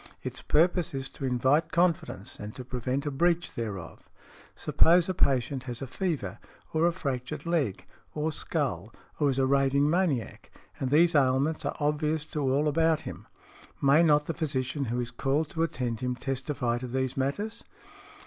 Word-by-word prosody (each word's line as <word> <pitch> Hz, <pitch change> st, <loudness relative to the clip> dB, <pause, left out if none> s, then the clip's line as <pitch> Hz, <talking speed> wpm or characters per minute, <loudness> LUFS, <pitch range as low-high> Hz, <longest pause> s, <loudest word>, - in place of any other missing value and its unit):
Its -, -, -5 dB
purpose 170 Hz, 0 st, +2 dB
is 135 Hz, 0 st, -3 dB
to 135 Hz, -, -7 dB
invite 135 Hz, +6 st, +2 dB
confidence 170 Hz, -, 0 dB
and 105 Hz, +1 st, -7 dB
to 130 Hz, -, -8 dB
prevent 130 Hz, +3 st, -2 dB
a 145 Hz, -, -1 dB
breach 170 Hz, +4 st, +1 dB
thereof. 100 Hz, -7 st, -6 dB, 0.5 s
Suppose 170 Hz, +1 st, +4 dB
a 185 Hz, -, 0 dB
patient 135 Hz, -5 st, +1 dB
has 120 Hz, -2 st, -5 dB
a 135 Hz, -, -4 dB
fever, 140 Hz, -, -3 dB, 0.3 s
or 160 Hz, +2 st, +3 dB
a -, -, +3 dB
fractured 140 Hz, -3 st, -4 dB
leg 160 Hz, -, 0 dB, 0.3 s
or 155 Hz, +1 st, 0 dB
skull, 120 Hz, -, -2 dB, 0.3 s
or 145 Hz, -2 st, +3 dB
is 135 Hz, -, 0 dB
a 135 Hz, -, +3 dB
raving 140 Hz, +1 st, +3 dB
maniac, 155 Hz, -, 0 dB, 0.3 s
and 130 Hz, -, -1 dB
these 165 Hz, +5 st, +5 dB
ailments 140 Hz, +2 st, +2 dB
are -, -, -2 dB
obvious 150 Hz, +1 st, 0 dB
to 155 Hz, -, -5 dB
all 140 Hz, +2 st, +2 dB
about 160 Hz, +1 st, +2 dB
him, -, -, -8 dB, 0.5 s
may 140 Hz, +3 st, +5 dB
not 150 Hz, -3 st, +4 dB
the 165 Hz, -, -2 dB
physician 140 Hz, -3 st, -2 dB
who 120 Hz, +1 st, -2 dB
is 120 Hz, -1 st, -3 dB
called 140 Hz, +5 st, 0 dB
to 165 Hz, -, -2 dB
attend 125 Hz, -8 st, -1 dB
him 125 Hz, 0 st, -2 dB
testify 130 Hz, -2 st, -2 dB
to 125 Hz, -, -5 dB
these 130 Hz, +1 st, -2 dB
matters?" 205 Hz, +13 st, -2 dB
140 Hz, 170 wpm, -28 LUFS, 130-160 Hz, 0.5 s, these